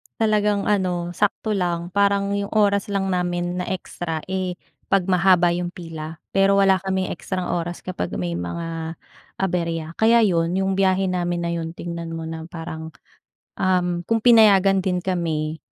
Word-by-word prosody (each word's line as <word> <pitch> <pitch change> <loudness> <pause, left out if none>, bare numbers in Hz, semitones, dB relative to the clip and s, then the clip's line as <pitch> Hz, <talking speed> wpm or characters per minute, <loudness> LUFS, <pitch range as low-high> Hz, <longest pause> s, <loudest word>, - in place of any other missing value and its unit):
Talagang, 210 -2 +2
ano, 180 -4 0
sakto 210 +1 0
lang 175 -2 -1
parang 200 0 +2
'yong 200 +1 -3
oras 200 -1 +3
lang 195 -1 0
namin 175 0 -1
na - - -3
extra, 175 -3 -4
eh, 185 -1 -2 0.3
'pag 195 -1 +1
mahaba 180 -1 +4
'yong 175 0 -3
pila. 165 -2 -8
Pero 195 0 +4
wala 195 -1 +5
kaming 190 -1 -2
extrang 185 +1 -4
oras 175 0 -3
kapag 185 -1 -4
may 85 -1 -2
mga 165 - -4 0.4
aberya. 170 -4 -1
Kaya, 230 +1 +5
'yon, 170 -3 +2
'yong 190 0 0
biyahe 190 -1 +2
namin 175 -1 -1
na 170 - -1
'yon 165 -1 -3
tingnan 170 -1 -6
mo 165 - -5
na 160 0 -6
parang, 160 -1 -7 0.7
um, 180 -2 +1
kung 225 0 +2
pinayagan 200 -5 +6
din 180 -1 0
kami 160 -4 -2
180 Hz, 155 wpm, -22 LUFS, 170-195 Hz, 0.7 s, pinayagan